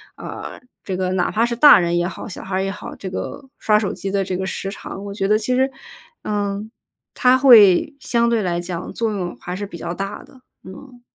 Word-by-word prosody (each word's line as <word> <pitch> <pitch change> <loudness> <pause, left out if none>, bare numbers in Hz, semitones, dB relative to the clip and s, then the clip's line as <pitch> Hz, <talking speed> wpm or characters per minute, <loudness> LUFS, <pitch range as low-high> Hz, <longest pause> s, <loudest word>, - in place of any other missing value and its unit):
啊， - - -8 0.2
这 190 - -4
个 185 0 -1
哪 180 -1 0
怕 225 +2 +1
是 235 0 -2
大 290 +4 +9
人 175 -1 +1
也 175 0 +1
好， - - -7
小 - - -7
孩 190 0 -4
儿 190 - 0
也 195 - -2
好， 205 - -8
这 190 - -7
个 185 +8 -6 0.2
刷 210 -1 +3
手 210 -2 -1
机 195 - -5
的 195 0 0
这 185 -1 -3
个 190 - -3
时 195 +1 -4
长。 195 -1 -8
我 200 - -6
觉 195 -1 -1
得 215 +1 +4
其 225 +4 -1
实， 260 +1 +2 0.5
嗯， 205 +1 -3 0.4
它 255 0 +4
会 235 -1 +6
相 235 -2 +1
对 230 -2 +1
来 175 -3 -1
讲 175 -1 -6
作 225 -2 -1
用 180 -4 -4
还 180 - -5
是 205 - -4
比 170 - -9
较 170 +1 -5
大 195 +2 -5
的， 260 - -19 0.2
嗯。 245 +7 -13
200 Hz, 250 characters per minute, -20 LUFS, 185-230 Hz, 0.5 s, 大